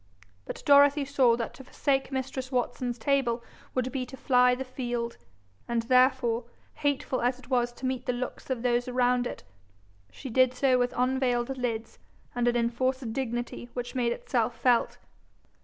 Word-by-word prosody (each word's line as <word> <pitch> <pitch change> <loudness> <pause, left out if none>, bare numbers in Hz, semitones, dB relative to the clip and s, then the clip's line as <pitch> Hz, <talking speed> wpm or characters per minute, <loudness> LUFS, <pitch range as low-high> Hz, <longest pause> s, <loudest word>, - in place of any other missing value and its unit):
But - - -7
Dorothy 285 0 +6
saw 265 -4 +3
that 230 - -4
to 265 - -12
forsake 270 +1 -1
mistress 260 0 -4
Watson's 245 -1 -1
table 240 -2 +1 0.3
would 255 0 0
be 265 -2 -2
to 265 - -10
fly 250 -1 +4
the 265 +1 -5
field, 240 -2 -4 0.5
and 235 -1 0
therefore, 250 -1 +3 0.3
hateful 280 -3 -1
as 245 +1 +1
it 260 - -16
was 240 -1 +2
to 250 - -8
meet 255 -1 -2
the - - +3
looks 245 +2 -5
of 250 -3 -2
those 245 0 +1
around 250 0 +2
it, - - -8 0.7
she 265 - -8
did 255 +1 +4
so 255 -1 +3
with 245 0 +1
unvailed 255 0 +1
lids 230 -3 -4 0.3
and 245 0 0
an 240 - +2
enforced 240 +1 0
dignity 240 -1 -4
which 245 -1 -4
made 245 -2 +1
itself 235 -1 -1
felt. 245 -1 +2
250 Hz, 165 wpm, -28 LUFS, 240-260 Hz, 0.7 s, Dorothy